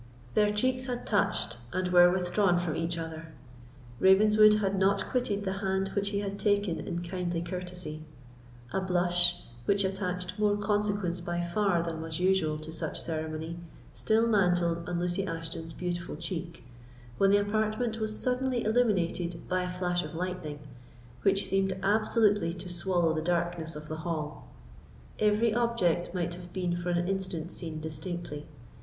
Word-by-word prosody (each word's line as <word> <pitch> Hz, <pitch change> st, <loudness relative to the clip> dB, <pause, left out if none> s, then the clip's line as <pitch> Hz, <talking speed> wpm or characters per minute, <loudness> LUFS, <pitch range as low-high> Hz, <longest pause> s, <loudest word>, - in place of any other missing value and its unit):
Their 210 Hz, -1 st, +4 dB
cheeks 255 Hz, +5 st, 0 dB
had 245 Hz, -1 st, -3 dB
touched 195 Hz, -, +1 dB
and 185 Hz, 0 st, -1 dB
were 175 Hz, 0 st, +7 dB
withdrawn 180 Hz, +1 st, +2 dB
from 175 Hz, -3 st, -1 dB
each 165 Hz, +1 st, -1 dB
other; 165 Hz, 0 st, -6 dB, 0.7 s
Ravenswood 210 Hz, +2 st, +6 dB
had 200 Hz, -2 st, 0 dB
not 195 Hz, +1 st, +2 dB
quitted 210 Hz, -6 st, 0 dB
the 190 Hz, 0 st, -2 dB
hand 190 Hz, 0 st, 0 dB
which 200 Hz, 0 st, -1 dB
he 200 Hz, 0 st, -1 dB
had 200 Hz, 0 st, -4 dB
taken 205 Hz, -5 st, +1 dB
in 170 Hz, +2 st, -4 dB
kindly 175 Hz, -1 st, -2 dB
courtesy; 180 Hz, -2 st, -5 dB, 0.7 s
a 190 Hz, -, +1 dB
blush, 175 Hz, -1 st, +2 dB, 0.2 s
which 200 Hz, 0 st, +2 dB
attached 185 Hz, 0 st, -2 dB
more 205 Hz, -1 st, +3 dB
consequence 205 Hz, -3 st, 0 dB
by 175 Hz, 0 st, -3 dB
far 175 Hz, 0 st, +1 dB
than 165 Hz, -1 st, -4 dB
was 160 Hz, 0 st, -4 dB
usual 180 Hz, -4 st, +2 dB
to 155 Hz, +1 st, -8 dB
such 160 Hz, -, -2 dB
ceremony, 160 Hz, +1 st, -4 dB, 0.3 s
still 220 Hz, +1 st, +2 dB
mantled 175 Hz, -5 st, +2 dB
on 175 Hz, -1 st, -1 dB
Lucy 180 Hz, +2 st, -1 dB
Ashton's 165 Hz, 0 st, -5 dB
beautiful 175 Hz, -1 st, -4 dB
cheek, 170 Hz, +1 st, -5 dB, 0.6 s
when 195 Hz, -, +5 dB
the 200 Hz, -, +6 dB
apartment 215 Hz, +3 st, 0 dB
was 215 Hz, -1 st, -1 dB
suddenly 250 Hz, -1 st, 0 dB
illuminated 180 Hz, -7 st, 0 dB
by 185 Hz, 0 st, +1 dB
a 180 Hz, -, -3 dB
flash 180 Hz, -1 st, -1 dB
of -, -, -7 dB
lightning, 175 Hz, -4 st, -4 dB, 0.6 s
which 195 Hz, 0 st, +3 dB
seemed 195 Hz, 0 st, +1 dB
absolutely 205 Hz, -3 st, +2 dB
to 180 Hz, +1 st, -8 dB
swallow 175 Hz, -2 st, +1 dB
the 155 Hz, -, -1 dB
darkness 170 Hz, -1 st, -1 dB
of 150 Hz, 0 st, -8 dB
the 155 Hz, -, -4 dB
hall. 160 Hz, -2 st, -4 dB, 0.7 s
Every 215 Hz, +1 st, +3 dB
object 225 Hz, -8 st, +1 dB
might 175 Hz, -1 st, -2 dB
have 175 Hz, 0 st, -9 dB
been 180 Hz, -2 st, -1 dB
for 175 Hz, 0 st, -3 dB
an 175 Hz, 0 st, +1 dB
instant 185 Hz, -3 st, -2 dB
seen 160 Hz, -3 st, -5 dB
distinctly. 160 Hz, -1 st, -5 dB
180 Hz, 155 wpm, -29 LUFS, 170-205 Hz, 0.7 s, were